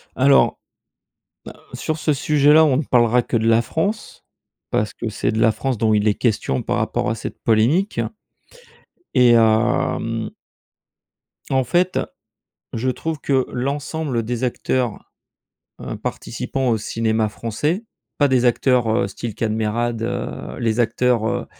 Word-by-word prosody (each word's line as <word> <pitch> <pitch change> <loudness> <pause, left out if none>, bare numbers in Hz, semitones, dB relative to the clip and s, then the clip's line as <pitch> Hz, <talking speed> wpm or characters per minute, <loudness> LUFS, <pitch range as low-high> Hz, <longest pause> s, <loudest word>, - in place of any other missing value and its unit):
Alors, 135 +1 +4 0.9
heu, - - -21
sur 155 - -3
ce 155 -1 +1
sujet-là, 150 +2 +4
on 135 -4 +2
ne 155 - 0
parlera 120 -2 +3
que 120 - -1
de 110 - 0
la 115 0 +4
France, 200 - -3 0.5
parce 105 - 0
que 115 - -4
c'est 110 - -1
de 110 - -2
la 115 0 +4
France 130 +2 -2
dont 110 0 +2
il 105 0 +2
est 105 - +4
question 105 - 0
par - - -1
rapport - - -1
à 110 - -1
cette 110 - -7
polémique 125 - +2 1.2
et, 125 -2 +6
hem 110 0 +1 1.2
en 130 -1 +2
fait, 175 +8 +1 0.8
je 125 +3 0
trouve 160 +5 -4
que 135 -2 +1
l'ensemble 140 0 -2
des 120 +2 -3
acteurs, 125 -1 -2 0.7
heu, - - -5
participants 135 -2 -3
au 115 - +2
cinéma 110 0 0
français, 150 - -2 0.3
pas 145 - +4
des 130 -2 +2
acteurs, 125 -1 +2
heu, 110 -2 +1
style 110 +2 -6
Kad 110 -2 -1
Merad, 110 +1 -1
heu, 115 - -4
les 115 0 0
acteurs, 120 0 +1
heu, 120 -1 -2
120 Hz, 145 wpm, -21 LUFS, 110-135 Hz, 1.2 s, et